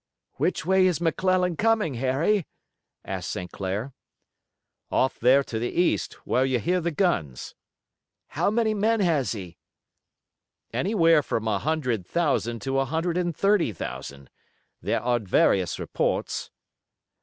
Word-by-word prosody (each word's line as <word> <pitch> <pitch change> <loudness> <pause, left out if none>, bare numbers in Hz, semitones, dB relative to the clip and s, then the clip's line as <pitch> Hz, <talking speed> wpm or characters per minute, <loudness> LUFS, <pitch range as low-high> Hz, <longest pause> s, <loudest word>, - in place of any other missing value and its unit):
"Which - - 0
way 190 +1 +4
is 175 -4 0
McClellan 180 +1 +1
coming, 220 -8 +2
Harry?" 135 - +1 0.6
asked - - -4
St. 90 -1 -5
Clair. 100 +7 -4 1.0
"Off 130 - +1
there 130 +4 +5
to 115 -4 -4
the 120 - -1
east, 175 0 0
where 130 - +2
you 130 -1 +1
hear 180 +8 0
the 170 - 0
guns." 140 - -1 0.8
"How - - 0
many 220 0 +1
men 215 +1 +1
has 150 - +1
he?" 90 -7 -9 1.1
"Anywhere 165 -6 +3
from 115 -3 -3
a 105 -3 +1
hundred 130 - -1
thousand 135 -8 0
to 135 0 0
a 135 - +1
hundred 165 +5 -1
and 175 -2 -1
thirty 200 - +2
thousand. 70 -6 -7 0.5
There - - -1
are 120 0 +2
various 95 -3 +2
reports." - - -2
150 Hz, 135 wpm, -25 LUFS, 115-180 Hz, 1.1 s, there